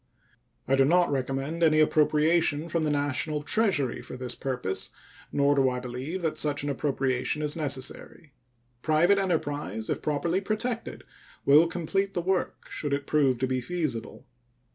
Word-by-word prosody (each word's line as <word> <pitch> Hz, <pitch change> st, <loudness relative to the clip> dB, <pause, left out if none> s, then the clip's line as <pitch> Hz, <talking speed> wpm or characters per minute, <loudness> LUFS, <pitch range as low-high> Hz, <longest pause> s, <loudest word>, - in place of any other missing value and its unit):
I 135 Hz, -, +1 dB
do 135 Hz, 0 st, +5 dB
not 175 Hz, +3 st, +3 dB
recommend 135 Hz, +4 st, -2 dB
any 155 Hz, -2 st, +4 dB
appropriation 155 Hz, +1 st, +2 dB
from 165 Hz, 0 st, 0 dB
the -, -, +1 dB
National 145 Hz, +1 st, -1 dB
Treasury 150 Hz, -, +1 dB
for 120 Hz, -, -9 dB
this 125 Hz, -1 st, -4 dB
purpose, 125 Hz, -8 st, -3 dB, 0.4 s
nor 140 Hz, 0 st, +3 dB
do 135 Hz, -2 st, +3 dB
I 125 Hz, 0 st, -3 dB
believe 130 Hz, +9 st, -5 dB
that 160 Hz, -, -1 dB
such 145 Hz, -1 st, 0 dB
an 145 Hz, -, -1 dB
appropriation 135 Hz, 0 st, -1 dB
is 150 Hz, 0 st, 0 dB
necessary. 145 Hz, +1 st, -3 dB, 0.5 s
Private 170 Hz, +7 st, +3 dB
enterprise, 145 Hz, -, -2 dB
if -, -, -2 dB
properly 165 Hz, +5 st, 0 dB
protected, 225 Hz, +3 st, -3 dB, 0.4 s
will 150 Hz, +4 st, +6 dB
complete 195 Hz, +4 st, -2 dB
the 175 Hz, -, 0 dB
work 190 Hz, +1 st, -1 dB
should 145 Hz, -2 st, -3 dB
it 140 Hz, 0 st, -1 dB
prove 140 Hz, -5 st, +2 dB
to 130 Hz, +2 st, -1 dB
be 130 Hz, 0 st, -1 dB
feasible. 150 Hz, -5 st, -4 dB
145 Hz, 155 wpm, -27 LUFS, 135-170 Hz, 0.5 s, will